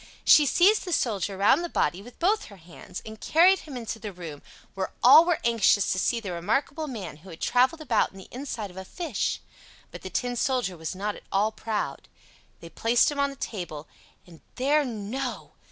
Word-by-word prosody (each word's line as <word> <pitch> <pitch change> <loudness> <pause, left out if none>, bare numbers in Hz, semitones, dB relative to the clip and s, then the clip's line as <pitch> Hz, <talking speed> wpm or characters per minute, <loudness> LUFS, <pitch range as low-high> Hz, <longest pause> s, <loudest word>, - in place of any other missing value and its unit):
She 295 -2 +7
seized 390 - +4
the 360 - -3
Soldier 200 - -1
round 215 - +4
the 345 - -4
body 175 - 0
with 240 +4 -14
both 420 +5 +1
her 200 - -13
hands, 175 +1 -11
and 220 0 -10
carried 360 +4 +5
him 285 -5 -9
into 225 -1 -5
the 210 -1 -6
room, 165 -6 -9 0.3
where 190 -1 -3
all 290 +7 +9
were 350 -2 +2
anxious 225 -4 +3
to 185 - 0
see 235 +5 +1
the 200 -5 -6
remarkable 270 - -1
man 215 - -7
who 180 +5 -15
had 165 - -10
traveled 260 +6 +2
about 240 -8 +1
in 195 - -15
the 190 - -11
inside 240 -6 -5
of 180 - -16
a 190 - -5
fish; 300 - -3 0.5
but - - -9
the - - -7
Tin 245 -1 -2
Soldier 245 -6 0
was 160 +2 -5
not 205 +2 -3
at - - -13
all 205 +3 +2
proud. 215 -1 -4 0.5
They 170 - -10
placed 235 +5 +2
him 290 - -5
on 280 0 +2
the 275 - -9
table, 170 - -6 0.4
and 170 -3 -16
there—no! 260 -3 -1
225 Hz, 200 wpm, -26 LUFS, 190-275 Hz, 0.5 s, all